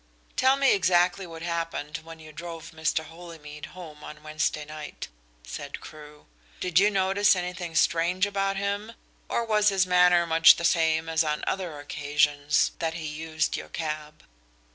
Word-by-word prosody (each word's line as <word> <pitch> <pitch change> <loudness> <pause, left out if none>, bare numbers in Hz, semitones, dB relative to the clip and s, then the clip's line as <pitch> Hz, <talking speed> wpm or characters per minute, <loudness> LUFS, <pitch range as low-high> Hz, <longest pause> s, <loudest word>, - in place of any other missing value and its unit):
"Tell 260 +1 +4
me 275 -1 +4
exactly 185 0 +2
what 165 -1 -9
happened 165 -3 -3
when 165 0 -12
you 155 -1 -12
drove 165 +1 -8
Mr. 160 0 -1
Holymead 160 -2 -10
home 155 -4 -10
on 150 0 -10
Wednesday 155 0 -2
night," 150 0 -8 0.4
said - - -7
Crewe. 150 -1 -13 0.3
"Did 180 -1 +2
you 205 +2 +5
notice 195 +1 +3
anything 180 -2 -5
strange 170 +4 +2
about 195 -1 -1
him, 200 +3 -3 0.4
or 235 - 0
was 210 -1 +3
his 190 -2 +2
manner 180 -1 +5
much 165 0 +7
the 170 - -3
same 160 -1 +2
as 165 0 +2
on 150 -1 -2
other 180 -6 -3
occasions 145 0 +1
that 160 -1 -2
he 165 -2 -5
used 155 +1 -2
your - - -7
cab?" 150 -1 -5
165 Hz, 160 wpm, -26 LUFS, 155-185 Hz, 0.4 s, much